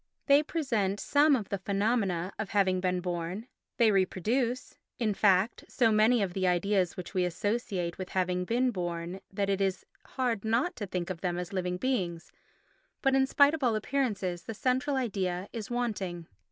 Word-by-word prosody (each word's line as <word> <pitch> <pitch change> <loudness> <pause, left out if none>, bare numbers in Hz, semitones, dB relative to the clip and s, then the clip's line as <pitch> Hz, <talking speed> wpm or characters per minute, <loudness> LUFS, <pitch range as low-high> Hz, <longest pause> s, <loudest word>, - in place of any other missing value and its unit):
They 280 0 +6
present 230 - -1
some 290 0 +4
of 215 -6 -4
the 200 - -2
phenomena 195 -3 0
of 215 - -3
having 190 -2 +2
been 180 -1 0
born—they 185 +6 -2
reproduce, 225 +6 0 0.2
in 220 -3 0
fact, 195 +2 +2
so 230 -4 +3
many 215 +1 +4
of 185 -3 -3
the 185 0 0
ideas 180 0 +1
which 180 - -7
we 185 - +2
associate 180 -1 -2
with 185 - -5
having 180 -1 0
been 245 +6 +1
born 175 -1 -4
that 200 0 -1
it 195 0 0
is 190 -1 -1 0.2
hard 245 -6 -2
not 235 +11 +1
to 205 - -4
think 180 0 -3
of 170 - -7
them 175 -2 -1
as 180 +1 -5
living 180 -1 -1
beings—but 255 - -4
in 265 0 +4
spite 285 +2 +5
of 315 -3 -3
all 235 -3 +3
appearances 215 -8 -1
the 225 - -5
central 260 +5 0
idea 195 -7 -1
is 225 -3 -5
wanting. 205 -8 -2
200 Hz, 170 wpm, -29 LUFS, 180-240 Hz, 0.2 s, They